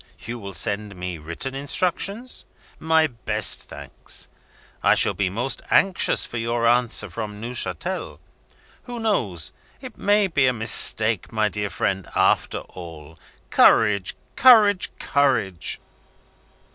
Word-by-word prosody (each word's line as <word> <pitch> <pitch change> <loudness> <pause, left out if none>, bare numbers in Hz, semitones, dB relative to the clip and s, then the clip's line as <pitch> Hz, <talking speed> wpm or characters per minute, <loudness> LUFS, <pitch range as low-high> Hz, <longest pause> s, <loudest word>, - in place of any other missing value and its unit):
You 120 +1 -6
will 100 -3 -9
send 105 +2 0
me 90 -2 -6
written 85 - -5
instructions? 185 - -2 0.4
My 160 0 +2
best 110 -6 0
thanks. - - -6 0.5
I - - +4
shall - - +3
be 100 -3 -1
most 120 +6 -2
anxious 195 -2 +3
for 120 - -7
your 115 +1 -2
answer 120 0 +2
from 105 -2 -7
Neuchatel. 110 -7 -3 0.7
Who 245 -1 -7
knows? 100 - -1 0.3
It - - -11
may 205 +1 +2
be 145 -8 +1
a 125 - +2
mistake, 110 -2 +3
my 110 -2 0
dear 105 -1 -4
friend, 95 +1 -3
after - - +1
all. 80 -3 -12 0.3
Courage! 100 -3 +3 0.2
courage! 215 -7 +5
courage!" 115 - 0
115 Hz, 120 wpm, -22 LUFS, 100-145 Hz, 0.7 s, courage